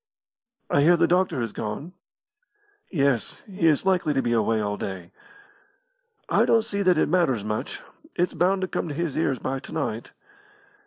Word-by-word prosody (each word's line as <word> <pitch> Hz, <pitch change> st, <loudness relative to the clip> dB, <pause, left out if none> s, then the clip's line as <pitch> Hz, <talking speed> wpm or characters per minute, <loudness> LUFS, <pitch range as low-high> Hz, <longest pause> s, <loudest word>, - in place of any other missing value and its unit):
"I 140 Hz, -, +2 dB
hear 170 Hz, +4 st, +5 dB
the -, -, +4 dB
doctor 180 Hz, -7 st, +1 dB
has 115 Hz, -3 st, -3 dB
gone." 125 Hz, +12 st, -5 dB, 1.0 s
"Yes; 140 Hz, -, 0 dB
he 185 Hz, -5 st, 0 dB
is 155 Hz, +2 st, +2 dB
likely 180 Hz, -6 st, +2 dB
to 135 Hz, -, +2 dB
be 120 Hz, -, 0 dB
away 110 Hz, 0 st, +2 dB
all 105 Hz, -1 st, -1 dB
day." 95 Hz, -4 st, -6 dB, 1.2 s
"I -, -, +3 dB
don't 225 Hz, -1 st, +3 dB
see 200 Hz, -1 st, -3 dB
that 180 Hz, -3 st, +3 dB
it -, -, +3 dB
matters 150 Hz, -, +1 dB
much. 110 Hz, 0 st, -4 dB, 0.3 s
It's 175 Hz, +1 st, 0 dB
bound 190 Hz, +2 st, +1 dB
to 185 Hz, -, -1 dB
come 175 Hz, -, -3 dB
to 145 Hz, -, -5 dB
his 165 Hz, -2 st, -2 dB
ears 140 Hz, -4 st, 0 dB
by 135 Hz, +2 st, -3 dB
to -, -, -12 dB
night." 120 Hz, -8 st, -3 dB
150 Hz, 175 wpm, -25 LUFS, 115-180 Hz, 1.2 s, hear